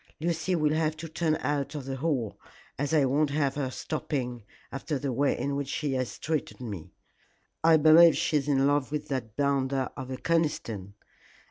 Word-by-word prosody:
Lucy 170 Hz, +2 st, 0 dB
will 155 Hz, -2 st, +2 dB
have 155 Hz, 0 st, 0 dB
to 165 Hz, +1 st, -6 dB
turn 160 Hz, 0 st, 0 dB
out 145 Hz, 0 st, -1 dB
of 145 Hz, -3 st, -5 dB
the 135 Hz, 0 st, -4 dB
Hall, 130 Hz, -7 st, -1 dB, 0.4 s
as 145 Hz, +2 st, -2 dB
I 150 Hz, -3 st, +4 dB
won't 145 Hz, +3 st, +2 dB
have 140 Hz, -1 st, 0 dB
her 140 Hz, -3 st, -2 dB
stopping, 130 Hz, -3 st, -3 dB, 0.3 s
after 140 Hz, +2 st, -3 dB
the 135 Hz, -1 st, -2 dB
way 140 Hz, +3 st, +1 dB
in 140 Hz, 0 st, -2 dB
which 140 Hz, -1 st, -2 dB
she 145 Hz, 0 st, -2 dB
has 130 Hz, -2 st, -2 dB
treated 155 Hz, -1 st, -3 dB
me. 105 Hz, -10 st, -7 dB, 0.7 s
I 165 Hz, 0 st, +7 dB
believe 160 Hz, +2 st, +7 dB
she 155 Hz, -, +1 dB
is 145 Hz, -1 st, -2 dB
in 135 Hz, -2 st, +3 dB
love 145 Hz, -1 st, +1 dB
with 150 Hz, -1 st, -3 dB
that 120 Hz, -6 st, -4 dB
bounder 135 Hz, -2 st, +1 dB
of 130 Hz, -, -7 dB
a 130 Hz, -, -4 dB
Conniston. 115 Hz, -, -1 dB
145 Hz, 190 wpm, -28 LUFS, 130-155 Hz, 0.7 s, I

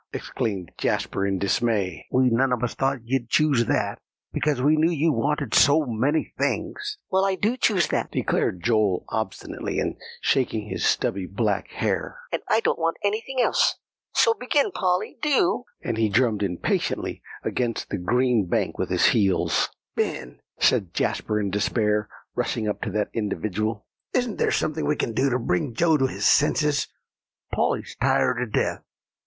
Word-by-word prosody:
exclaimed 95 Hz, -5 st, -3 dB
Jasper 95 Hz, -, 0 dB
in 95 Hz, -1 st, 0 dB
dismay, 100 Hz, -4 st, 0 dB
"we 130 Hz, -1 st, +3 dB
none 130 Hz, +3 st, +2 dB
of 125 Hz, -1 st, 0 dB
us 120 Hz, -, -1 dB
thought 135 Hz, -1 st, -1 dB
you'd 120 Hz, -1 st, -1 dB
choose 140 Hz, -5 st, +3 dB
that, -, -, 0 dB, 0.3 s
because 150 Hz, -4 st, 0 dB
we 145 Hz, +4 st, +4 dB
knew 155 Hz, +2 st, +3 dB
you 160 Hz, -1 st, +1 dB
wanted 145 Hz, -3 st, -1 dB
so 145 Hz, +2 st, +5 dB
many 130 Hz, +6 st, 0 dB
things." 420 Hz, 0 st, -2 dB
"Well, 190 Hz, 0 st, +3 dB
I 195 Hz, -1 st, +2 dB
do 215 Hz, +6 st, 0 dB
choose 205 Hz, -8 st, +2 dB
that," -, -, -1 dB
declared 90 Hz, -, -1 dB
Joel 110 Hz, -5 st, +2 dB
obstinately, 110 Hz, -3 st, -3 dB
and -, -, -2 dB, 0.2 s
shaking 115 Hz, -5 st, 0 dB
his -, -, -3 dB
stubby 95 Hz, -1 st, +1 dB
black 100 Hz, -1 st, -1 dB
hair; -, -, -2 dB
"and -, -, -1 dB
I -, -, +3 dB
don't -, -, 0 dB
want 165 Hz, 0 st, 0 dB
anything 220 Hz, +6 st, -1 dB
else. -, -, +3 dB, 0.4 s
So 460 Hz, -, +5 dB
begin, 295 Hz, -, +1 dB
Polly, 180 Hz, -, -1 dB
do;" 285 Hz, -4 st, +2 dB, 0.2 s
and 115 Hz, -1 st, -2 dB
he 110 Hz, -1 st, +3 dB
drummed 110 Hz, 0 st, +2 dB
impatiently 90 Hz, -4 st, -1 dB, 0.2 s
against 120 Hz, -2 st, -2 dB
the -, -, -2 dB
green 120 Hz, +2 st, +2 dB
bank -, -, -1 dB
with -, -, -1 dB
his -, -, +3 dB
heels. 100 Hz, -5 st, +2 dB, 0.3 s
"Ben," -, -, -3 dB, 0.2 s
said 90 Hz, -4 st, +2 dB
Jasper 105 Hz, 0 st, 0 dB
in 100 Hz, -2 st, -1 dB
despair, 105 Hz, +1 st, 0 dB, 0.2 s
rushing 115 Hz, -2 st, -1 dB
up 105 Hz, -, -2 dB
to -, -, -2 dB
that 105 Hz, -1 st, -1 dB
individual, 110 Hz, 0 st, -2 dB, 0.3 s
"isn't 245 Hz, -4 st, 0 dB
there -, -, +2 dB
anything 155 Hz, 0 st, 0 dB
we 150 Hz, -, +2 dB
can 115 Hz, -, -2 dB
do 135 Hz, +4 st, +2 dB
to 125 Hz, -, +1 dB
bring 115 Hz, +1 st, -1 dB
Joe 165 Hz, +2 st, +3 dB
to 135 Hz, -2 st, +2 dB
his -, -, -4 dB
senses? 150 Hz, -1 st, +3 dB, 0.7 s
Polly's -, -, -1 dB
tired 125 Hz, -1 st, +2 dB
to 125 Hz, -, -1 dB
death. 110 Hz, -, -1 dB
120 Hz, 165 wpm, -24 LUFS, 105-155 Hz, 0.7 s, so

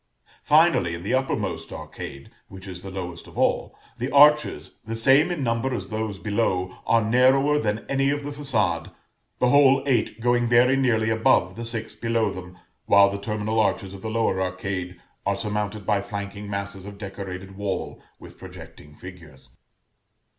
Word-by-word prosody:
Finally, 150 Hz, -, +3 dB
in 85 Hz, -, -9 dB
the 100 Hz, -, -2 dB
uppermost 100 Hz, -11 st, -1 dB
arcade, 70 Hz, 0 st, -9 dB, 0.2 s
which 95 Hz, +1 st, -11 dB
is 90 Hz, -2 st, -8 dB
the 95 Hz, -, -8 dB
lowest 90 Hz, -3 st, -7 dB
of -, -, -14 dB
all, -, -, 0 dB, 0.2 s
the 125 Hz, +3 st, -2 dB
arches, 150 Hz, +2 st, +4 dB
the 115 Hz, +1 st, -5 dB
same 135 Hz, +8 st, +4 dB
in 170 Hz, -6 st, -2 dB
number 115 Hz, +2 st, -1 dB
as -, -, -6 dB
those 110 Hz, -2 st, -3 dB
below, 95 Hz, -3 st, -1 dB
are 115 Hz, 0 st, +3 dB
narrower 135 Hz, +5 st, +4 dB
than 105 Hz, -4 st, -2 dB
any 135 Hz, 0 st, +1 dB
of 145 Hz, 0 st, -1 dB
the 145 Hz, -, -5 dB
façade; 105 Hz, -, -1 dB, 0.5 s
the 125 Hz, -, +2 dB
whole 135 Hz, -1 st, +5 dB
eight 120 Hz, -4 st, 0 dB
going 120 Hz, +1 st, +2 dB
very 120 Hz, +3 st, +4 dB
nearly 110 Hz, -5 st, +1 dB
above 110 Hz, -5 st, +2 dB
the 115 Hz, -, -6 dB
six 115 Hz, -1 st, -5 dB
below 115 Hz, -2 st, 0 dB
them, 90 Hz, -1 st, -9 dB, 0.3 s
while 100 Hz, 0 st, +6 dB
the 100 Hz, -, -4 dB
terminal 110 Hz, +1 st, -2 dB
arches 100 Hz, -2 st, 0 dB
of 95 Hz, -, -10 dB
the 110 Hz, -, -4 dB
lower 110 Hz, -4 st, 0 dB
arcade 95 Hz, -1 st, -4 dB, 0.2 s
are 100 Hz, -, 0 dB
surmounted 105 Hz, -1 st, -3 dB
by 105 Hz, -1 st, +1 dB
flanking 100 Hz, 0 st, -6 dB
masses 100 Hz, -1 st, -5 dB
of 100 Hz, 0 st, -9 dB
decorated 95 Hz, -1 st, -7 dB
wall 100 Hz, -1 st, -4 dB, 0.2 s
with -, -, -14 dB
projecting 80 Hz, -5 st, -12 dB
figures. 75 Hz, -8 st, -13 dB
105 Hz, 170 wpm, -24 LUFS, 95-120 Hz, 0.5 s, while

